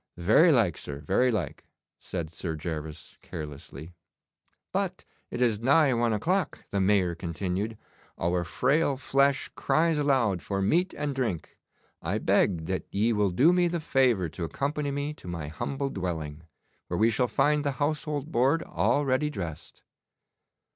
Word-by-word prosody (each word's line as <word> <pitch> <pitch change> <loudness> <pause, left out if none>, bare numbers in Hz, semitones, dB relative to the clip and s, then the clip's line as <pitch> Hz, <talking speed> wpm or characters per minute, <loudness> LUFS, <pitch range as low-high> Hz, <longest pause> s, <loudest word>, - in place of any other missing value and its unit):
'Very 110 - +5
like, 115 - +2
sir, 70 -1 -6
very 125 - +2
like,' 110 -3 -2 0.4
said 85 -4 -5
Sir 85 -1 -4
Gervas 80 -1 -6
carelessly. 75 +1 -8 0.8
'But - - -2 0.2
it 125 - -1
is 110 -4 +2
nigh 140 +3 +4
one 120 -1 +1
o'clock,' 170 - -1
the 100 - +1
Mayor 95 -3 +3
continued, 95 +5 -3 0.4
'our 85 +1 0
frail 140 - +1
flesh 140 +1 +1
cries 160 -1 +2
aloud 130 - +2
for 100 -1 -3
meat 170 - +1
and 150 -1 -2
drink. 120 -11 -3 0.5
I - - -1
beg 85 -4 +2
that 95 +2 -3
ye 110 +4 +1
will 105 -2 +2
do 135 - +4
me 180 -1 +3
the 170 0 -1
favour 125 - +2
to 85 +3 -6
accompany 145 - -2
me 145 +2 -2
to 120 - -14
my 85 -4 -4
humble 135 - -3
dwelling, 80 -4 -4 0.4
where 85 - -2
we 110 +5 +4
shall 125 +3 +1
find 145 +6 +2
the 140 -1 0
household 150 +1 -2
board 140 +5 +2
already 145 +1 +1
dressed. 85 - -7
115 Hz, 150 wpm, -28 LUFS, 85-145 Hz, 0.8 s, Very